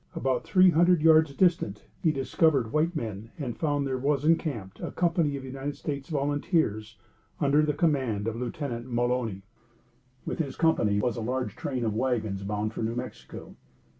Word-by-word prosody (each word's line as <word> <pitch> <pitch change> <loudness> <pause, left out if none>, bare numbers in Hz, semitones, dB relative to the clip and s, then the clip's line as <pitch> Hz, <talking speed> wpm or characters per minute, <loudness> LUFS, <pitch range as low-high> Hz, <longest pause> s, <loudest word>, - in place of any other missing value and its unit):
About 130 0 0
three 185 -1 +5
hundred 170 0 +4
yards 160 -2 +6
distant 170 - +1 0.2
he 160 - +3
discovered 135 -3 +1
white 160 +3 +1
men, 110 -4 -5
and 130 -7 -4
found 145 -3 0
there 130 -1 -2
was 140 +1 0
encamped 145 - 0
a - - -4
company 165 -4 +1
of 135 - -8
United 135 +2 -5
States 140 -2 -5
volunteers, 140 - -1 0.4
under 145 0 +3
the 150 -1 0
command 130 -10 0
of 115 - -2
Lieutenant 125 -1 -4
Mulony. 120 -5 -1 0.8
With - - -4
this 140 -5 -2
company 110 -11 +2
was 120 +2 -1
a - - -3
large 125 +3 -2
train 140 -7 -3
of 110 - 0
wagons 110 -4 -1
bound 105 +2 -2
for - - -5
New 115 +1 -1
Mexico. 125 +1 -8
135 Hz, 165 wpm, -27 LUFS, 115-155 Hz, 0.8 s, yards